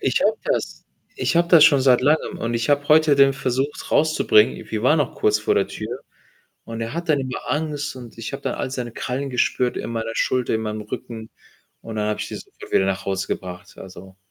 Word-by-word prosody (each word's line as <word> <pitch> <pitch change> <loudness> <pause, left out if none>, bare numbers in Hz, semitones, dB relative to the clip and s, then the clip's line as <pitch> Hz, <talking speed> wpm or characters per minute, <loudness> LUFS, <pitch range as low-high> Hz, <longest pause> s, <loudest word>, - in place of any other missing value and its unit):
Ich - - +1
habe - - +2
das - - -2 0.4
ich - - 0
habe 170 0 +3
das 165 -3 +8
schon 145 -4 +5
seit 130 -2 +4
Langem 150 +4 +1
und 115 +1 -2
ich 115 0 -1
habe 145 0 +1
heute 155 -1 +5
den 135 0 +6
versucht, 135 +1 -3
rauszubringen. 155 -8 +3
Wir 110 -1 -2
waren 150 +6 +4
noch 145 -4 -1
kurz 105 0 +2
vor 110 - 0
der 100 - +2
Tür 120 +4 -6 0.6
und 115 0 -6
er 115 - -4
hat 170 +1 -5
dann 150 -2 +3
immer 130 -1 -5
Angst 150 -2 -2
und 120 -2 -11
ich 115 +4 -5
hab - - -7
dann - - -2
all - - -3
seine 125 -3 -5
Krallen 135 +4 -4
gespürt 125 0 0
in - - -5
meiner 115 -1 -3
Schulter, 125 0 0
in 110 - 0
meinem 110 -1 -4
Rücken. 110 +1 -7 0.5
Und 115 -1 -8
dann 105 0 -1
habe 105 - -2
ich - - -4
die - - -7
sofort - - -12
wieder - - +4
nach 95 0 -2
Hause 95 -1 -1
gebracht. 90 +1 -7
Also 95 0 -12
125 Hz, 225 wpm, -22 LUFS, 110-145 Hz, 0.6 s, das